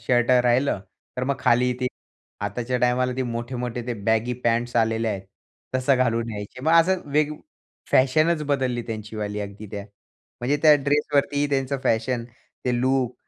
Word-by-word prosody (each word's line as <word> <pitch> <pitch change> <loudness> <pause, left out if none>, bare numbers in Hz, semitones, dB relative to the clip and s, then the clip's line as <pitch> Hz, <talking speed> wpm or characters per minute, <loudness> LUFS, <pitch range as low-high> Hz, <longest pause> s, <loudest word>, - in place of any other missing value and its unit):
Shirt 120 +1 +2
राहिलं, 125 -2 +3 0.4
तर 125 - -1
मग 140 +1 0
खाली 125 +1 +3
ते 125 - +1 0.6
आताच्या 120 +5 -2
टायमाला 125 +1 +2
ते 130 - 0
मोठे-मोठे 120 0 -4
ते 120 - -2
बॅगी 110 +2 +2
पँट्स 120 +1 +1
आलेले 115 0 +2
आहेत 100 -2 -3 0.5
तसं 130 +1 +3
घालून 115 -2 +1
यायचे. 105 +4 -7
मग 160 +2 +2
असं 175 +3 +4
वेग 150 0 +2 0.6
फॅशनच 155 +5 +3
बदलली 130 -4 0
त्यांचीवाली 105 -1 -4
अगदी 100 +1 -7
त्या 100 -1 -5 0.6
म्हणजे 135 +4 +1
त्या 155 -1 +8
ड्रेसवरतीही 145 0 +1
त्यांचं 135 0 0
फॅशन 115 +1 +1 0.4
ते 125 -1 +1
लुक 130 -1 +1
125 Hz, 150 wpm, -24 LUFS, 115-135 Hz, 0.6 s, त्या